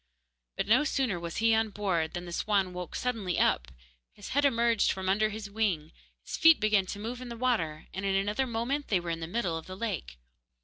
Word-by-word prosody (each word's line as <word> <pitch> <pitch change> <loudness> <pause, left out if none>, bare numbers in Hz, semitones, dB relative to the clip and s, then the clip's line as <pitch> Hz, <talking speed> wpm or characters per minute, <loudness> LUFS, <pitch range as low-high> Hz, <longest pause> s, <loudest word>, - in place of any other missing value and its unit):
But - - 0
no 235 +8 +4
sooner 265 - 0
was 170 -1 -5
he 225 0 +4
on 220 0 +2
board 190 -6 -1
than 175 0 -4
the 175 - -8
swan 195 0 0
woke 180 -1 -6
suddenly 225 -8 -1
up; - - +2 0.5
his 205 - -10
head 285 +2 +2
emerged 235 -4 +3
from 190 0 -4
under 215 +3 +3
his 215 -1 -6
wing, 200 -7 -1 0.3
his - - -5
feet 325 0 +7
began 210 -3 +2
to 205 - -5
move 235 +4 -5
in 250 - -7
the 235 - -6
water, 215 -12 0
and 190 - -4
in 195 -1 +1
another 210 +7 0
moment 245 +5 -2
they 195 - +2
were 170 -1 -4
in 165 - -3
the 165 - -5
middle 180 -3 -1
of 160 - -13
the 185 0 -7
lake. 65 - -4
205 Hz, 225 wpm, -29 LUFS, 180-230 Hz, 0.5 s, feet